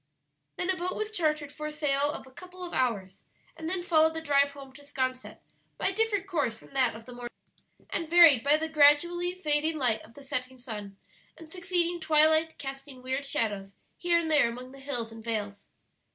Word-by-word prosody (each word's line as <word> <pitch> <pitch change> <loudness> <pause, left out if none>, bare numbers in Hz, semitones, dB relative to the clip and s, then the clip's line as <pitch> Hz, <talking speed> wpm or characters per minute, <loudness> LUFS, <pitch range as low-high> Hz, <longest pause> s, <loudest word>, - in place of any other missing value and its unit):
Then 360 - 0
a - - -1
boat 365 +1 -3
was 430 0 -3
chartered 305 -6 -1
for 305 +1 -6
a - - -5
sail 290 -1 +1
of 290 - -6
a 260 - -16
couple 365 +5 -11
of 350 - -6
hours, 200 -7 -1 0.3
and 325 0 -5
then 365 -1 -2
followed 320 -2 +3
the - - -1
drive 280 -2 +2
home 275 -2 -11
to 290 - -14
'Sconset 260 -2 -3 0.4
by - - +1
a - - -4
different 420 -2 0
course 290 - -1
from - - -18
that 255 -4 +2
of 225 0 -11
the 250 - -10
morning, 240 0 -7 0.6
and 330 -2 -3
varied 330 -8 +7
by 290 +2 +5
the 320 +1 -2
gradually 320 +4 +4
fading 310 -2 0
light 235 -6 +1
of 230 - -17
the 285 - -12
setting 255 -1 -4
sun 210 -5 -7 0.4
and 325 - -12
succeeding 350 0 -1
twilight 315 0 +3
casting 270 -1 -8
weird 260 +2 -2
shadows 205 -8 -2 0.2
here 345 -1 +2
and 325 -1 -1
there 290 -6 +5
among 250 +2 -8
the 275 - -13
hills 250 -5 -4
and 225 0 -11
vales. 210 -3 -4
290 Hz, 205 wpm, -28 LUFS, 255-330 Hz, 0.6 s, varied